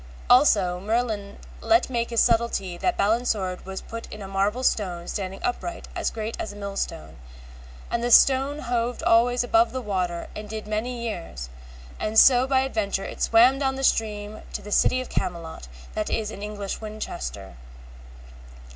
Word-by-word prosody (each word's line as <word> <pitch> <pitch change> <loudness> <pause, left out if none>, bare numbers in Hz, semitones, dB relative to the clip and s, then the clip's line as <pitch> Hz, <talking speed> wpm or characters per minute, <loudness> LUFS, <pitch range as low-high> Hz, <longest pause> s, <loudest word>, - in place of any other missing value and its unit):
Also 205 -9 +5
Merlin 215 -1 -2 0.2
let 340 +1 +3
make 235 -2 -1
by - - -9
his 230 - +4
subtilty 225 -6 0
that 360 - 0
Balin's 230 +4 +2
sword 185 -3 -2
was 190 0 -5
put 230 0 -8
in 210 -1 -8
a - - -7
marble 200 +6 0
stone 180 -8 0
standing 195 -1 -4
upright 335 +8 -3
as - - 0
great 220 0 -5
as 215 - -4
a - - -12
mill 200 -1 -6
stone, 80 - -4 0.7
and 235 - 0
the 240 - 0
stone 270 +3 +5
hoved 240 -1 -2
always 245 +2 +4
above 340 +7 +3
the 260 - -3
water 185 -6 -2
and 210 0 -7
did 215 0 -5
many 235 +3 -3
years, 165 - -6 0.5
and 215 +1 -2
so 255 +2 +7
by 265 -1 +3
adventure 215 -7 -1
it - - -8
swam 245 +4 +5
down 265 -1 0
the 270 - -5
stream 215 -3 0
to - - -5
the 210 - -9
City 255 +4 +3
of 255 - -8
Camelot, 170 - -4 0.3
that 215 -1 -2
is 215 -1 -2
in 200 - -9
English 205 -1 -5
Winchester. 210 - -6
215 Hz, 175 wpm, -25 LUFS, 195-245 Hz, 0.7 s, so